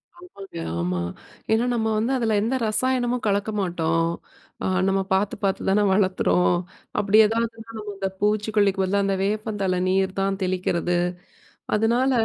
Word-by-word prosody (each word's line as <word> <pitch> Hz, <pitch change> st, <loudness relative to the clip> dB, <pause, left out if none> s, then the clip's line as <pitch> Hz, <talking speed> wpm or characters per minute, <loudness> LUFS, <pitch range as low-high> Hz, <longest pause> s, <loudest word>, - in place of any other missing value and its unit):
ஆமாங்க, 350 Hz, -, -12 dB, 0.2 s
ஆமா. 90 Hz, +1 st, -1 dB, 0.5 s
ஏன்னா 225 Hz, +2 st, +3 dB
நம்ம 225 Hz, -2 st, 0 dB
வந்து 225 Hz, +4 st, 0 dB
அதுல 230 Hz, -3 st, 0 dB
எந்த 230 Hz, +5 st, 0 dB
ரசாயனமும் 250 Hz, +1 st, 0 dB
கலக்க 200 Hz, +1 st, +1 dB
மாட்டோம். 165 Hz, -2 st, 0 dB, 0.6 s
அ -, -, +1 dB, 0.2 s
நம்ம 195 Hz, 0 st, +2 dB
பாத்து 195 Hz, +2 st, +1 dB
பாத்து 195 Hz, -1 st, 0 dB
தான 200 Hz, +2 st, +3 dB
வளர்க்குறோம் 185 Hz, -2 st, +2 dB, 0.4 s
அப்படி 210 Hz, +1 st, +3 dB
ஏதாவதுன்னா 230 Hz, +1 st, -2 dB
நம்ம 210 Hz, -1 st, -6 dB
அந்த 195 Hz, 0 st, -1 dB
பூச்சிக்கொல்லிக்கு 210 Hz, -1 st, +2 dB
பதிலா 200 Hz, +2 st, +1 dB
அந்த 195 Hz, 0 st, +1 dB
வேப்பந்தழ 205 Hz, -3 st, -1 dB
நீர் 190 Hz, 0 st, +1 dB
தான் 195 Hz, 0 st, 0 dB
தெளிக்கிறது. 180 Hz, -1 st, 0 dB, 0.8 s
அதனால 235 Hz, +5 st, +2 dB
205 Hz, 135 wpm, -24 LUFS, 190-225 Hz, 0.8 s, ஏன்னா